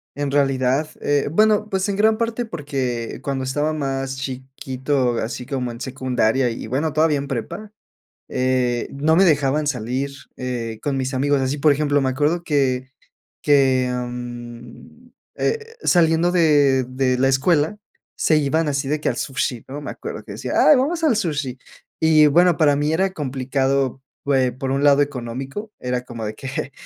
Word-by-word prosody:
En 145 0 -2
realidad, 135 +1 +1
eh 145 -1 +1
bueno, 215 +2 +3
pues, 190 +1 -1
en 200 - -1
gran 215 +1 +3
parte 230 +1 -2
porque 130 - -4
cuando 135 -1 -2
estaba 145 +4 -1
más 135 -2 -2
chiquito, 130 -1 -2
así 120 +2 -4
como 125 -3 -3
en 115 +2 -10
secundaria 130 -1 0
y 115 -1 -6
bueno, 145 +6 -1
todavía 155 -1 +3
en 140 - -4
prepa, 150 - -5 0.6
eh, 125 -2 0
no 150 +3 +2
me 190 - +5
dejaban 150 -2 +2
salir, 130 +2 -2 0.3
eh, 120 -3 -4
con 140 -2 -1
mis 130 +1 -2
amigos 140 +1 +2
así, 135 +3 -1
por 150 +1 +4
ejemplo, 145 0 +1
me 130 - +1
acuerdo 150 +6 0
que 130 -4 0 0.5
que, 130 -3 +3
mm, 120 - -7 0.3
eh, 455 0 -2
saliendo 170 0 +3
de 145 -7 +3
de 130 -1 0
la 135 0 +3
escuela 150 +7 +2 0.4
se 155 - +3
iban 150 +2 +1
así 140 -1 -1
de 150 0 -1
que - - +1
al - - -3
sushi, 130 -4 -2
¿no?, 145 +3 -7
me - - -6
acuerdo - - -7
que - - -9
decía: - - -5 0.2
"Ay, 300 - +9
vamos 325 +6 0
al 295 -7 +4
sushi". 145 - -2 0.4
Y, 155 -1 +6
bueno, 175 +3 +4
para 150 -3 +4
mí 150 +2 0
era 190 +3 +1
complicado, 135 -2 -1 0.3
eh, 130 -2 +3
por 130 +2 -4
un 140 +1 0
lado 145 0 +5
económico, 135 - -4
era 125 0 -2
como 115 -3 -7
de 105 +1 -5
que, 135 +1 -5
140 Hz, 170 wpm, -21 LUFS, 130-155 Hz, 0.6 s, Ay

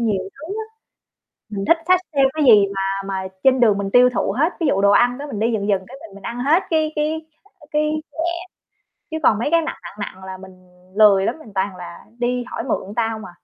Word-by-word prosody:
nhiều 210 -5 0
thứ 315 +8 -7
á. 440 0 -4 0.9
Mình 200 -2 -4
thích 335 - +6
xách 365 -1 +5 0.2
theo 275 - +5
cái 310 - +1
gì 210 -6 +7
mà 195 0 -1
mà 190 -1 -3 0.2
trên 260 -1 +5
đường 215 -4 +4
mình 195 -1 -3
tiêu 250 0 +6
thụ 195 -1 0
hết, 315 +5 +2
ví 330 - +1
dụ 195 - +2
đồ 200 - +5
ăn 245 +4 +3
đó 290 - -6
mình 215 - -5
đi 230 +1 +1
dần 205 -1 -2
dần 190 -2 +1
cái - - -10
mình 200 -3 -12
mình 200 - -13
ăn 235 - -5
hết 315 +8 +3
cái 315 -1 +1
cái, 315 +1 -1 0.3
ơ, 295 - -16
cái 300 0 +1
nhẹ. 310 +1 -7 0.9
Chứ 315 - -3
còn 215 -6 +4
mấy 235 - -1
cái 335 0 +4
nặng, 315 - -4
nặng, - - -9 0.2
nặng 190 0 -14
là 190 0 -7
mình 190 0 -12 0.4
lười 200 -3 +6
lắm, 245 - -2
mình 225 -10 -14
toàn 190 0 -1
là 175 -1 -10
đi 245 0 -1
hỏi 240 - -5
mượn 205 -5 -3
ta 225 -1 +1
hông 220 -2 -6
à. 180 - -10
230 Hz, 250 wpm, -20 LUFS, 195-295 Hz, 0.9 s, gì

